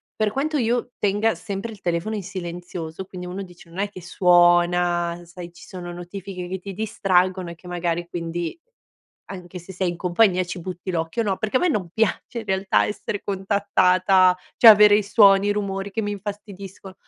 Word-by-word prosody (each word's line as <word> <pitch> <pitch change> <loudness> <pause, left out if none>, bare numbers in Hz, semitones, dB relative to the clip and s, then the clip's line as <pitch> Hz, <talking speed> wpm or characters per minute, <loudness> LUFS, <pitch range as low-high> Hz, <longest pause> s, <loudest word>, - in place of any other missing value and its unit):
Per 215 -1 0
quanto 295 +5 -1
io 245 0 0
tenga 205 +2 +1
sempre 205 +2 -5
il 210 - -12
telefono 175 +5 -2
in 205 - -4
silenzioso, 175 -2 -6
quindi 180 -1 -8
uno 185 +2 -5
dice: 175 -2 -13
"Non 170 +3 -9
è 200 0 0
che 185 - -11
suona", 175 0 +3
sai, 175 0 -10
ci 170 - -15
sono 175 -2 -7
notifiche 180 +1 -7
che 190 +1 -4
ti 195 +2 -8
distraggono 185 -3 0
e - - -9
che 180 +2 -16
magari 175 -1 -2
quindi 170 - -4 0.7
anche 180 -2 -8
se 180 +2 -11
sei 180 -1 0
in 175 - -6
compagnia 185 +1 +2
ci 180 +1 -6
butti 180 +1 -6
l'occhio, 165 +5 -1
no, 200 -3 -1
perché 215 +5 0
a - - -5
me 360 - +2
non 195 - -1
piace 225 +2 -1
in 225 - -6
realtà 190 0 +1
essere 205 -1 -4
contattata, 190 -2 +3 0.2
cioè 230 - +10
avere 210 0 +7
i 210 - +1
suoni, 200 -1 +5
i 205 - +3
rumori 200 -1 -3
che 210 - -2
mi 205 -1 -2
infastidisco, 200 -1 -8
190 Hz, 190 wpm, -23 LUFS, 175-205 Hz, 0.7 s, cioè